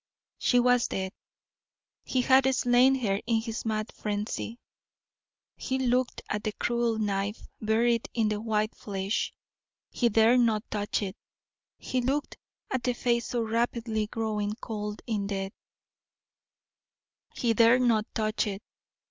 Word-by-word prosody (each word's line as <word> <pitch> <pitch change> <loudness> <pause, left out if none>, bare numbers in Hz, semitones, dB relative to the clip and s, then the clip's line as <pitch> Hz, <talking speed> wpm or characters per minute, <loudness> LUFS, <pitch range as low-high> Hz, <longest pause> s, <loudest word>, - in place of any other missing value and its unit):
She 245 - +3
was 245 0 +4
dead; 190 -1 -3 0.9
he 255 - 0
had 265 +1 +5
slain 250 +1 +5
her 205 -6 0
in 230 -1 +3
his 225 0 -5
mad 215 -1 -1
frenzy. 210 +2 -3 1.0
He 260 - -2
looked 255 -1 0
at 210 0 -2
the 215 - -2
cruel 235 -1 0
knife 205 0 -1 0.2
buried 230 +2 +2
in 225 -2 +2
the 210 0 -2
white 215 -1 0
flesh 195 0 -2 0.6
he 240 - +2
dare 225 +3 +5
not 220 -3 +2
touch 210 0 -1
it. 195 0 -4 0.6
He 255 - -2
looked 275 +4 -1 0.4
at 260 - 0
the 250 0 0
face 235 -1 0
so 240 -2 -1
rapidly 225 -1 -1
growing 215 -2 -2
cold 210 -3 -5
in 210 -4 -1
death 195 -1 -3 1.8
he 235 -2 +1
dare 230 +2 +6
not 230 -4 +2
touch 215 0 0
it. 200 0 -5
225 Hz, 135 wpm, -28 LUFS, 210-240 Hz, 1.8 s, dare